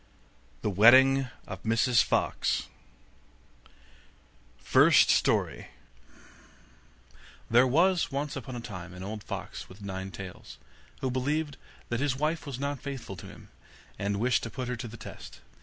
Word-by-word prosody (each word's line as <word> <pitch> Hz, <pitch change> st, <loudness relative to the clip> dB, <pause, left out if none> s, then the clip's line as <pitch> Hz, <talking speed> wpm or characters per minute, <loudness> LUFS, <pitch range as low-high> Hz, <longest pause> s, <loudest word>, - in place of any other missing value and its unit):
THE 105 Hz, -, 0 dB
WEDDING 130 Hz, +6 st, +6 dB, 0.2 s
OF 95 Hz, -2 st, -8 dB
MRS 115 Hz, +2 st, +3 dB
FOX -, -, 0 dB, 1.9 s
FIRST -, -, +5 dB
STORY -, -, +1 dB, 1.8 s
There 120 Hz, +3 st, +6 dB
was 170 Hz, +6 st, +3 dB
once 140 Hz, +1 st, -3 dB
upon 130 Hz, -2 st, -6 dB
a 120 Hz, -, -5 dB
time 90 Hz, -6 st, -8 dB
an 90 Hz, -, -8 dB
old 105 Hz, +2 st, -5 dB
fox -, -, -7 dB
with 100 Hz, +2 st, -13 dB
nine 95 Hz, -1 st, -5 dB
tails, 95 Hz, -1 st, -10 dB, 0.4 s
who 130 Hz, -, -1 dB
believed 145 Hz, +2 st, -1 dB, 0.3 s
that 120 Hz, -, -1 dB
his 140 Hz, -2 st, 0 dB
wife 155 Hz, +1 st, -1 dB
was 135 Hz, -3 st, -5 dB
not 140 Hz, 0 st, -3 dB
faithful 130 Hz, -8 st, -6 dB
to -, -, -10 dB
him, -, -, -14 dB, 0.5 s
and 100 Hz, 0 st, -1 dB
wished 120 Hz, +2 st, +2 dB
to 115 Hz, -, -5 dB
put 125 Hz, +1 st, -5 dB
her 125 Hz, -, -1 dB
to 120 Hz, +1 st, -6 dB
the 115 Hz, +2 st, -10 dB
test. -, -, -10 dB
125 Hz, 140 wpm, -29 LUFS, 105-135 Hz, 1.9 s, WEDDING